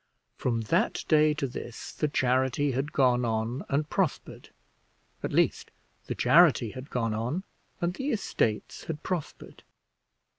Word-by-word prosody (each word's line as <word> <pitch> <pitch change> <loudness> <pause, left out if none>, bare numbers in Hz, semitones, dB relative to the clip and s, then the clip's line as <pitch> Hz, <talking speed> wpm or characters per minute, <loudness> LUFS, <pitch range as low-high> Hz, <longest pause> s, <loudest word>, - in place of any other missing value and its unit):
From 115 -2 -1
that 170 - 0
day 155 -1 +4
to 150 - -1
this 120 -2 -7
the 150 - -1
charity 130 +1 +1
had 135 +4 -2
gone 125 -4 +3
on 115 +5 -1
and 145 +2 0
prospered 185 -1 -2 0.7
at - - -3
least, - - +1 0.4
the - - -3
charity 150 -9 +5
had 130 +2 -9
gone 115 -3 -1
on, 125 - -2 0.4
and 175 +1 0
the 265 +9 -3
estates 190 - -1
had 155 -2 -5
prospered. 175 -5 -5
135 Hz, 140 wpm, -28 LUFS, 120-155 Hz, 0.7 s, charity